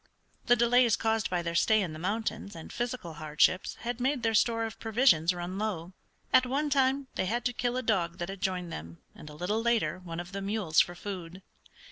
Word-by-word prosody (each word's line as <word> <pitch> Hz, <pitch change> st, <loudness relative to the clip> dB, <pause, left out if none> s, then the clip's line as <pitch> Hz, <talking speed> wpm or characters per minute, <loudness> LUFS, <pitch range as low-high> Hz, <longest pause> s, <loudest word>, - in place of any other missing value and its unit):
The 245 Hz, -, +6 dB
delays 240 Hz, -1 st, +4 dB
caused 220 Hz, -1 st, 0 dB
by 175 Hz, -1 st, -1 dB
their 170 Hz, 0 st, -3 dB
stay 215 Hz, +6 st, +4 dB
in 180 Hz, -6 st, -2 dB
the 155 Hz, -, -8 dB
mountains 215 Hz, +2 st, -3 dB
and 160 Hz, -, -9 dB
physical 240 Hz, -8 st, -4 dB
hardships 155 Hz, +4 st, +2 dB
had 240 Hz, 0 st, -3 dB
made 260 Hz, 0 st, 0 dB
their 225 Hz, -1 st, +2 dB
store 230 Hz, +1 st, +2 dB
of 225 Hz, -, -7 dB
provisions 220 Hz, -, +3 dB
run 180 Hz, +2 st, -5 dB
low. 185 Hz, -5 st, -3 dB, 0.4 s
At 255 Hz, -1 st, +6 dB
one 290 Hz, +3 st, -1 dB
time 270 Hz, 0 st, +2 dB
they 185 Hz, -, -1 dB
had 235 Hz, +4 st, -1 dB
to 245 Hz, -, +1 dB
kill 245 Hz, +1 st, -1 dB
a 255 Hz, -, -2 dB
dog 175 Hz, -7 st, 0 dB
that 175 Hz, -, -3 dB
had 195 Hz, -1 st, -7 dB
joined 180 Hz, -3 st, -2 dB
them, 85 Hz, +2 st, -8 dB, 0.2 s
and 150 Hz, -, -11 dB
a 150 Hz, -, -11 dB
little 205 Hz, +8 st, -1 dB
later 225 Hz, -9 st, +1 dB
one 170 Hz, -2 st, -7 dB
of 175 Hz, +1 st, -7 dB
the 195 Hz, 0 st, -4 dB
mules 195 Hz, -5 st, +1 dB
for 175 Hz, -, -3 dB
food. 185 Hz, -1 st, -7 dB
205 Hz, 215 wpm, -29 LUFS, 175-235 Hz, 0.4 s, The